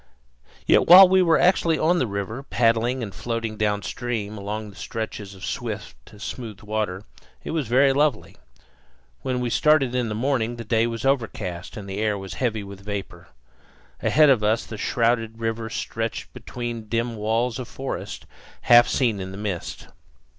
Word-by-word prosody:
Yet -, -, +4 dB
while 185 Hz, +2 st, +11 dB
we 190 Hz, +1 st, +4 dB
were 165 Hz, -2 st, +4 dB
actually 170 Hz, -3 st, +3 dB
on 175 Hz, +4 st, +2 dB
the 130 Hz, -, +1 dB
river, 100 Hz, +5 st, -4 dB
paddling 120 Hz, -1 st, +1 dB
and 100 Hz, -4 st, -6 dB
floating 115 Hz, -2 st, -3 dB
downstream 105 Hz, +1 st, -2 dB
along 105 Hz, +1 st, -5 dB
the 95 Hz, -, -9 dB
reaches 105 Hz, -3 st, -5 dB
of 95 Hz, -, -8 dB
swift, 60 Hz, +12 st, -6 dB
smooth 110 Hz, -2 st, -7 dB
water, 105 Hz, -3 st, -3 dB, 0.4 s
it -, -, -5 dB
was 160 Hz, -5 st, -1 dB
very 135 Hz, +4 st, +4 dB
lovely. 145 Hz, -4 st, 0 dB, 0.9 s
When 130 Hz, -1 st, -2 dB
we 120 Hz, -1 st, -2 dB
started 145 Hz, -4 st, +3 dB
in 125 Hz, -2 st, 0 dB
the 105 Hz, -, -3 dB
morning 120 Hz, -1 st, 0 dB
the 120 Hz, -, -7 dB
day 115 Hz, +1 st, +1 dB
was 115 Hz, 0 st, -4 dB
overcast 110 Hz, -10 st, -2 dB
and 100 Hz, -2 st, -7 dB
the 95 Hz, +1 st, -5 dB
air 105 Hz, -1 st, 0 dB
was 95 Hz, -1 st, -7 dB
heavy 110 Hz, -5 st, -1 dB
with 100 Hz, 0 st, -11 dB
vapor. 100 Hz, -4 st, -6 dB, 0.7 s
Ahead 150 Hz, -2 st, +5 dB
of 115 Hz, -5 st, +2 dB
us 110 Hz, +2 st, +1 dB
the 110 Hz, -, -8 dB
shrouded 115 Hz, 0 st, 0 dB
river 115 Hz, 0 st, -3 dB
stretched 115 Hz, +1 st, -4 dB
between 120 Hz, -3 st, -6 dB
dim 115 Hz, 0 st, -1 dB
walls 115 Hz, +3 st, -1 dB
of 125 Hz, -, -5 dB
forest, 115 Hz, -9 st, -6 dB, 0.4 s
half 120 Hz, 0 st, +7 dB
seen 115 Hz, -6 st, +1 dB
in 95 Hz, 0 st, -5 dB
the 95 Hz, -, -8 dB
mist. 100 Hz, -4 st, -5 dB
115 Hz, 170 wpm, -24 LUFS, 105-125 Hz, 0.9 s, while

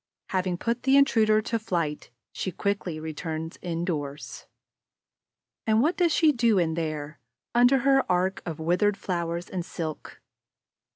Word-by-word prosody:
Having 185 Hz, -2 st, -1 dB
put 235 Hz, +5 st, -2 dB
the 270 Hz, +1 st, +4 dB
intruder 215 Hz, -6 st, +4 dB
to 230 Hz, 0 st, -1 dB
flight, 170 Hz, -8 st, -2 dB, 0.2 s
she 185 Hz, -, -3 dB
quickly 185 Hz, -3 st, -2 dB
returns 160 Hz, +1 st, -5 dB
indoors. 165 Hz, -5 st, -4 dB, 1.2 s
And 220 Hz, 0 st, +4 dB
what 315 Hz, +8 st, +2 dB
does 345 Hz, -2 st, +2 dB
she 315 Hz, -1 st, +4 dB
do 235 Hz, -5 st, +2 dB
in 165 Hz, -3 st, +2 dB
there, 155 Hz, -2 st, -4 dB, 0.3 s
under 245 Hz, +3 st, +5 dB
her 270 Hz, -4 st, +3 dB
arch 185 Hz, +2 st, +1 dB
of 165 Hz, -3 st, -6 dB
withered 180 Hz, +5 st, +1 dB
flowers 170 Hz, -2 st, -3 dB
and 180 Hz, -2 st, -4 dB
silk? 160 Hz, -3 st, -6 dB
180 Hz, 135 wpm, -26 LUFS, 165-225 Hz, 1.2 s, under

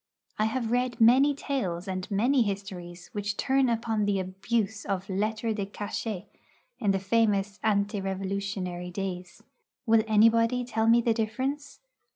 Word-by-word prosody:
I 215 Hz, -, +3 dB
have 230 Hz, 0 st, -1 dB
read 245 Hz, 0 st, 0 dB
many 260 Hz, +5 st, +6 dB
tales 200 Hz, -, -3 dB
and 185 Hz, -1 st, -4 dB
many 245 Hz, +7 st, +3 dB
histories 190 Hz, -4 st, -4 dB
which 205 Hz, 0 st, -3 dB
turn 265 Hz, -1 st, +2 dB
upon 225 Hz, -2 st, 0 dB
the 200 Hz, -1 st, +1 dB
abuse 205 Hz, +3 st, -2 dB
of 195 Hz, -1 st, -3 dB
lettres 215 Hz, +3 st, -1 dB
de 200 Hz, -2 st, -3 dB
cachet 205 Hz, -1 st, -4 dB, 0.5 s
in 210 Hz, -, 0 dB
the 195 Hz, -, +3 dB
famous 200 Hz, 0 st, +1 dB
ante 205 Hz, -1 st, +1 dB
Revolutionary 190 Hz, -2 st, -3 dB
days. 180 Hz, -1 st, -6 dB, 0.4 s
Will 225 Hz, -1 st, +5 dB
anybody 230 Hz, +3 st, +4 dB
tell 225 Hz, -2 st, 0 dB
me 235 Hz, +1 st, +6 dB
the 230 Hz, -1 st, +2 dB
difference? 260 Hz, +6 st, -3 dB
210 Hz, 145 wpm, -28 LUFS, 195-230 Hz, 0.5 s, many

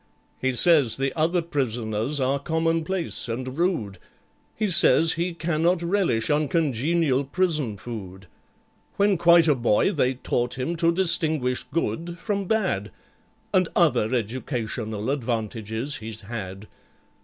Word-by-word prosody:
"He 130 Hz, -1 st, 0 dB
says 145 Hz, -5 st, +4 dB
the 135 Hz, 0 st, -1 dB
other 170 Hz, +2 st, +1 dB
prisoners 120 Hz, -3 st, -2 dB
are 135 Hz, +1 st, +1 dB
commonplace 165 Hz, +1 st, -1 dB
and 130 Hz, +3 st, -4 dB
rude; 160 Hz, -, -1 dB, 0.6 s
He 215 Hz, -, 0 dB
says 165 Hz, -2 st, +4 dB
he 170 Hz, +2 st, -1 dB
cannot 170 Hz, +1 st, 0 dB
relish 170 Hz, -, +1 dB
uncongenial 150 Hz, -1 st, +1 dB
prison 150 Hz, -, -1 dB
food. 95 Hz, -4 st, -8 dB, 0.7 s
When 200 Hz, 0 st, +3 dB
quite 170 Hz, -1 st, +5 dB
a 150 Hz, -, +5 dB
boy 120 Hz, -, +2 dB
they 135 Hz, -7 st, +1 dB
taught 120 Hz, 0 st, -2 dB
him 150 Hz, +7 st, -2 dB
to 165 Hz, 0 st, +3 dB
distinguish 160 Hz, -7 st, +1 dB
Good 170 Hz, +1 st, -3 dB
from 200 Hz, +2 st, -2 dB
Bad, 185 Hz, -, 0 dB, 0.6 s
And -, -, +3 dB
other 110 Hz, -, +3 dB
educational 115 Hz, -1 st, -3 dB
advantages 115 Hz, 0 st, -3 dB
he's 110 Hz, 0 st, -8 dB
had. 100 Hz, -2 st, -7 dB
140 Hz, 120 wpm, -24 LUFS, 115-170 Hz, 0.7 s, quite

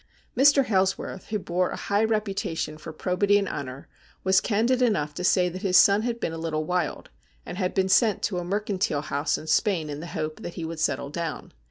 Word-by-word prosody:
Mr. 275 Hz, +1 st, +5 dB
Hailsworth, 190 Hz, -2 st, -1 dB
who 215 Hz, -, -1 dB
bore 180 Hz, -2 st, -1 dB
a -, -, -4 dB
high 200 Hz, +2 st, 0 dB
reputation 200 Hz, -7 st, -1 dB
for 155 Hz, -, -8 dB
probity 185 Hz, +5 st, +1 dB
and 200 Hz, -1 st, 0 dB
honour, 135 Hz, -3 st, -6 dB, 0.4 s
was 190 Hz, 0 st, +4 dB
candid 235 Hz, +4 st, +1 dB
enough 190 Hz, -12 st, +1 dB
to 180 Hz, -, -5 dB
say 180 Hz, 0 st, +3 dB
that 180 Hz, +1 st, -6 dB
his 190 Hz, -3 st, +3 dB
son 200 Hz, +1 st, +6 dB
had 235 Hz, 0 st, -2 dB
been 165 Hz, -, -2 dB
a 165 Hz, -, -5 dB
little 155 Hz, -1 st, -2 dB
wild, 180 Hz, -, -2 dB, 0.3 s
and 180 Hz, -, -7 dB
had 185 Hz, -2 st, -1 dB
been 190 Hz, -1 st, +2 dB
sent 210 Hz, +1 st, +3 dB
to 180 Hz, -4 st, 0 dB
a -, -, -4 dB
mercantile 195 Hz, -5 st, -1 dB
house 145 Hz, +1 st, -1 dB
in -, -, -9 dB
Spain 165 Hz, -3 st, +1 dB
in 145 Hz, -, -5 dB
the 165 Hz, -, -7 dB
hope 155 Hz, -2 st, -4 dB
that 175 Hz, -, -7 dB
he 165 Hz, -, -4 dB
would 165 Hz, 0 st, -6 dB
settle 140 Hz, -2 st, -1 dB
down. 165 Hz, +1 st, -5 dB
185 Hz, 215 wpm, -26 LUFS, 160-205 Hz, 0.4 s, son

